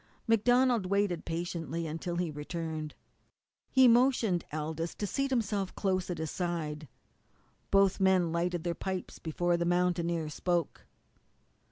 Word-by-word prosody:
MacDonald 240 -1 +3
waited 200 -3 0
patiently 170 -1 -3
until 165 +2 -4
he 175 -2 -1
returned. 155 0 -5 0.7
He 260 -1 +6
motioned 235 -7 +3
Aldous 160 +2 -3
to 210 - -3
seat 275 +7 -1
himself 205 -6 -1
close 185 -2 0
at 180 - -2
his 160 -1 -3
side. 160 -4 -3 0.8
Both 195 -1 +4
men 190 -3 +3
lighted 170 0 -1
their 175 - -1
pipes 185 +2 -5
before 175 +2 0
the 170 - -1
mountaineer 170 -2 +1
spoke. 175 +2 -2
175 Hz, 130 wpm, -31 LUFS, 165-195 Hz, 0.8 s, He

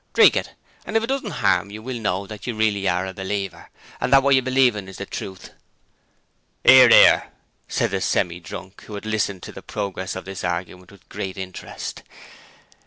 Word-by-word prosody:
Drink - - +6
it! - - -3 0.3
And 220 - -1
if 225 - 0
it 230 - -4
doesn't 270 -5 -2 0.2
harm 100 0 +3
you, 105 +2 -9
we'll 125 -1 -5
know 100 -1 -1
that 105 +1 -9
you 120 - -2
really 105 -3 +1
are 90 +1 0
a 95 - -6
believer 95 -3 -5 0.3
and 125 - -2
that 135 -1 +6
what 140 0 +4
you 130 - +5
believe 130 -2 +3
is 95 -2 -8
the - - -5
truth!' 95 -1 -8 1.1
''Ear, 130 -2 +9
'ear!' - - +7 0.4
said - - -1
the - - -1
Semi 85 0 0
drunk, 90 +2 -10
who 105 - -8
had 100 - -7
listened 105 -3 -2
to - - -8
the - - -10
progress 95 -2 -4
of - - -7
the 95 0 -7
argument 90 +1 -5
with 100 - -19
great 95 0 -6
interest. 95 -1 -7
100 Hz, 195 wpm, -22 LUFS, 95-120 Hz, 1.1 s, Ear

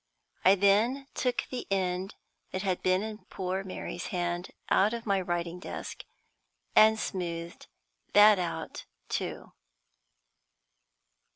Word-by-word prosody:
I 190 +2 +7
then 215 +8 +3
took 250 -1 0
the 255 - -4
end 185 0 -1 0.3
that 185 +1 -3
had 185 -2 0
been 185 +2 +2
in 215 -1 -5
poor 190 +1 -3
Mary's 185 -2 -5
hand 175 0 -2 0.2
out 210 +4 +3
of 235 - -7
my 200 -2 +2
writing 175 -1 -2
desk, - - -7 0.7
and 220 0 +7
smoothed 170 -4 -4 0.5
that 205 -1 +8
out 175 -2 -4 0.2
too. - - -3
190 Hz, 115 wpm, -29 LUFS, 180-210 Hz, 0.7 s, that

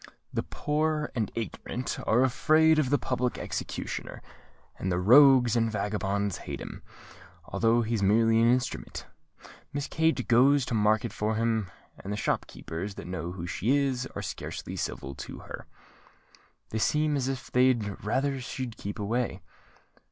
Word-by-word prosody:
The - - 0
poor 150 0 -1
and 110 -4 -1
ignorant 120 +2 -4
are 120 +4 +4
afraid 155 +4 +4
of 140 -5 +1
the 145 - +4
public 125 -2 -1
executioner; - - -5 0.6
and 95 - -1
the 90 - +1
rogues 125 +4 +7
and 115 -1 +2
vagabonds 100 -2 -1
hate - - -6
him, - - -8 0.6
although 115 +1 +2
he's 115 -1 -1
merely 115 +3 +4
an 115 +1 +5
instrument. 125 0 -2 0.7
Miss 145 0 -2
Kate 160 -6 +1
goes 130 +3 +5
to 125 - -4
market 105 0 +2
for 110 +1 -1
him; 110 -3 0 0.3
and 100 - -5
the 105 - -2
shop - - -1
keepers 95 +5 -6
that - - -8
know 90 -1 -4
who 85 -2 -6
she 115 +10 +1
is, 135 -3 0
are - - -4
scarcely - - -6
civil 70 - -4
to - - -8
her. - - -9 1.0
They 110 - -1
seem 150 +5 +2
as 135 -2 0
if 135 -2 -4
they'd 120 -7 +2
rather 135 +5 0
she'd 125 -2 -5
keep 100 0 -5
away." 115 +4 -2
115 Hz, 155 wpm, -28 LUFS, 105-135 Hz, 1.0 s, rogues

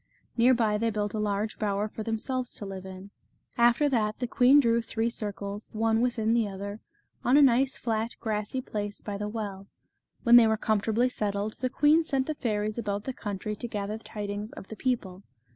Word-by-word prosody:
Near 250 +2 +5
by 215 -3 +1
they 230 +1 +1
built 210 -1 -2
a 215 - -2
large 210 +1 -1
bower 205 0 0
for 215 - -8
themselves 235 +3 -2
to 205 - -6
live 190 -1 -7
in. 190 +1 -10 0.4
After 240 +5 +4
that, 215 -5 0
the 250 - -2
queen 250 +4 +5
drew 235 -3 +3
three 230 0 -2
circles, 205 -1 -5
one 225 +1 +2
within 230 -2 +1
the 230 -2 +2
other, 200 +2 -6 0.4
on 255 +4 +4
a - - +7
nice 260 +1 +3
flat 225 0 -2
grassy 215 +3 -2
place 205 -4 -4
by 200 -1 -5
the 210 - -2
well. 200 -3 -5 0.6
When 240 0 +8
they 235 -2 +7
were 220 0 +2
comfortably 220 +3 +1
settled, 210 -2 -2
the 255 - 0
queen 300 +5 +4
sent 275 -4 0
the 310 - -2
fairies 215 -4 -2
about 205 -2 -2
the 265 - -4
country 210 -2 -4
to 240 - -5
gather 210 -1 -4
tidings 205 0 -5
of 195 - -10
the 220 - -6
people. 210 -7 -2
220 Hz, 195 wpm, -28 LUFS, 205-240 Hz, 0.6 s, When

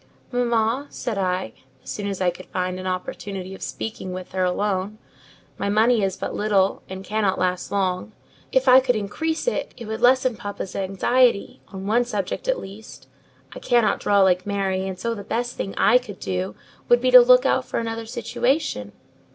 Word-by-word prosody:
"Mamma," 240 +2 +1
said 220 -5 -4
I, 180 - -1 0.3
as - - -7
soon 205 -1 -4
as 195 -2 -4
I 180 -1 +3
could 180 +1 -12
find 185 0 -3
an 185 - -5
opportunity 185 +1 -5
of 190 - -11
speaking 200 -4 -5
with 185 0 -7
her 185 -1 0
alone, 195 +2 -1 0.6
"my 200 - -1
money 220 +2 +3
is 195 -2 -1
but - - -4
little, 200 -2 +1
and 190 0 -7
cannot 210 -1 0
last 180 0 -1
long; 190 0 -1 0.4
if 260 0 +2
I 255 0 +9
could 255 -2 +1
increase 320 - -2
it, - - -2
it 235 - -8
would 220 +2 -5
lessen 255 0 +4
papa's 205 -2 -6
anxiety, 200 +4 +1
on 190 -1 -8
one 230 +4 +3
subject 210 - -4
at - - +1
least. 205 +3 -11 0.5
I - - -8
cannot 240 -3 +2
draw 200 -1 +3
like 185 0 +2
Mary, 195 -2 -1
and 190 -1 -5
so 230 +5 -2
the 205 -3 -7
best 240 +4 -2
thing 195 - -4
I 245 +4 +5
could 210 -7 -10
do 95 +2 -3 0.3
would 240 - +6
be 255 +1 +1
to 250 0 +11
look 250 +1 +6
out 260 -1 +2
for - - -2
another 225 -1 -4
situation." 235 - -1
205 Hz, 190 wpm, -23 LUFS, 190-240 Hz, 0.6 s, to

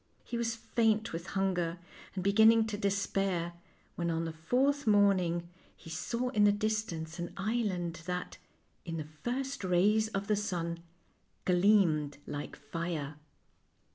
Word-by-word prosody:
He - - -6
was 230 -1 0
faint 225 -2 +1
with 165 +2 -5
hunger 180 -3 0 0.4
and 185 - -2
be 200 +1 +2
ginning 220 +1 +7
to 215 - -2
despair, 195 -3 0 0.4
when 170 -1 -2
on 165 0 0
the 165 - -4
fourth 255 - +1
morning 185 -5 +3 0.3
he 165 - -12
saw 235 +9 -2
in 215 -5 +2
the 205 - +7
distance 205 -6 -2
an 175 - -4
island 190 -6 -1
that, 180 0 -4 0.4
in 165 -2 -4
the 155 -1 -5
first 265 +1 -2
rays 200 +4 +3
of 200 -2 -3
the 210 0 +2
sun, 170 -5 -2 0.7
gleamed 180 -6 +3
like 145 0 -5
fire. 165 -4 -4
195 Hz, 140 wpm, -32 LUFS, 170-220 Hz, 0.7 s, ginning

